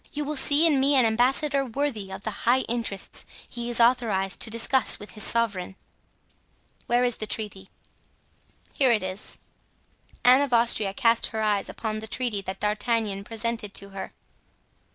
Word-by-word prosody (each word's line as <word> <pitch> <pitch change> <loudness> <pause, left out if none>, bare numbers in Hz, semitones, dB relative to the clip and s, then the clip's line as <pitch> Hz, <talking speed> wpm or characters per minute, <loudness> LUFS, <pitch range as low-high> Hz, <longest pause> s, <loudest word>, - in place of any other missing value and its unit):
You 295 0 -2
will 300 +1 -3
see 290 +3 +3
in 300 -5 +3
me 280 +2 +3
an 255 -3 +5
ambassador 270 +5 +2
worthy 245 -6 -3
of 190 +1 -8
the 215 - -3 0.2
high 255 +2 +4
interests 230 -5 -4 0.2
he 240 0 -6
is 240 - -1
authorized 230 -6 +2
to - - 0
discuss 230 +3 +3
with 205 - -11
his 215 - -4
sovereign." 200 -6 +1 1.1
"Where 240 +1 +2
is 245 -2 0
the 215 - -3
treaty?" 200 -3 -3 1.0
"Here 265 -3 +3
it 220 -4 +1
is." 185 +2 -4 0.9
Anne 255 +2 +7
of 280 -3 -1
Austria 230 -4 +2
cast 230 -2 +3
her 220 -1 -3
eyes 205 -2 0
upon 215 -1 -4
the 220 - -8
treaty 230 -3 -2
that 190 0 -7
D'Artagnan 210 -1 -1
presented 225 -1 -4
to 200 - -5
her. 195 -1 -7
230 Hz, 165 wpm, -25 LUFS, 205-250 Hz, 1.1 s, Anne